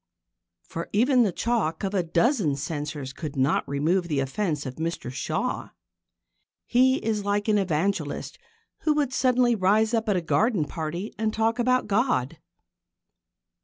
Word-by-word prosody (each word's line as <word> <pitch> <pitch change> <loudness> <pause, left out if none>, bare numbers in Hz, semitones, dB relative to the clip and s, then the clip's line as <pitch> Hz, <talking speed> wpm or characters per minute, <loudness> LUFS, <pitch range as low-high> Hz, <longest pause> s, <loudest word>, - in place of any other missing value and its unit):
For 165 - -6
even 250 +5 +4
the 210 -5 +3
chalk 205 -6 -1
of 195 0 -2
a 195 - +2
dozen 170 - +1
censors 145 -2 -4
could 150 0 -6
not 135 +3 +1
remove 165 +6 +1
the 150 -4 0
offence 150 +2 -2
of 130 -1 -6
Mr 165 -5 -3
Shaw. 130 - -2 1.0
He 260 +2 +4
is 215 -2 0
like 205 +1 0
an 210 -1 +3
evangelist 175 -3 -2 0.4
who 305 -2 +1
would 285 -4 0
suddenly 250 -1 +3
rise 215 +2 +2
up 225 -1 0
at 205 - +3
a 180 - +1
garden 200 0 +1
party 165 +7 -5
and 220 -1 +1
talk 225 +2 0
about 255 +1 +2
God. 205 - 0
195 Hz, 150 wpm, -26 LUFS, 155-225 Hz, 1.0 s, even